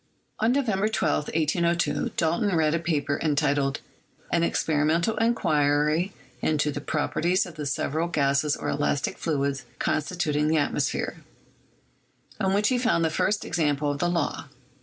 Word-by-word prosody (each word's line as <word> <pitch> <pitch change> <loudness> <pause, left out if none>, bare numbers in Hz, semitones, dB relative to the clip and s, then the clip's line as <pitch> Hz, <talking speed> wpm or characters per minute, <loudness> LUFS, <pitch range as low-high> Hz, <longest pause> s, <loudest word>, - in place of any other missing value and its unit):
On 225 +2 +3
November 215 -7 +1
12, 150 -8 0
1802, 170 +2 0
Dalton 170 +4 +1
read 155 -2 +2
a 165 - +1
paper 150 -4 -1
entitled 145 -2 +1 0.5
"An 170 - +2
Experimental 165 +4 +1
Enquiry 155 -6 +2 0.3
into 150 -1 +1
the 145 - -5
Properties 170 +5 0
of 175 - -10
the 150 -2 -5
Several 155 +4 -1
Gases 140 -2 +1
or - - -5
Elastic 145 0 -1
Fluids 140 -4 -1
constituting 150 -2 0
the 160 - +2
Atmos 145 -2 +1
phere," - - -3 1.2
in 190 - +1
which 205 +4 +2
is 250 -1 +1
found 220 -9 +2
the 160 - 0
first 205 +6 0
example 150 -3 0
of 145 - -5
the 175 - +1
law. 170 -5 -1
155 Hz, 145 wpm, -26 LUFS, 145-175 Hz, 1.2 s, On